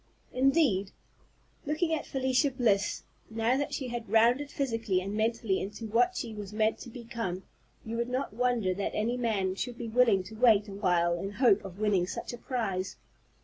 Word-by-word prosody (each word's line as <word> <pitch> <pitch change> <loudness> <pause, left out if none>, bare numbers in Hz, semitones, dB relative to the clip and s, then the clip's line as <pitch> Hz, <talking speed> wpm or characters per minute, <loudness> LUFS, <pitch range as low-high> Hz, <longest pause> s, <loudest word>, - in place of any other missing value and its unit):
Indeed, 260 - +3 0.8
looking 320 +2 0
at 315 - -2
Felicia 265 +2 +1
Bliss, 230 -6 +1 0.3
now 225 +2 +1
that 285 +1 -1
she 260 -3 -3
had 240 -1 -5
rounded 240 +6 +3
physically 225 -9 -1
and 195 +2 -5
mentally 220 -2 0
into 205 +3 -6
what 240 - +2
she 230 -2 -4
was 205 -2 -7
meant 215 +1 +1
to 245 - -9
become, 230 -6 -5 0.4
you 225 +1 -4
would 235 +1 -1
not 255 -2 -2
wonder 240 -5 +1
that 195 +2 -3
any 230 +3 0
man 215 -6 0
should 240 +5 -4
be 235 -2 -5
willing 225 -5 +4
to 210 - -11
wait 220 -3 +4
a 200 - -8
while 180 -4 +2
in 195 +3 -5
hope 225 -3 +4
of 190 -2 -9
winning 200 -4 +1
such 205 - -5
a 240 - -8
prize. 195 -7 -2
225 Hz, 185 wpm, -29 LUFS, 200-250 Hz, 0.8 s, willing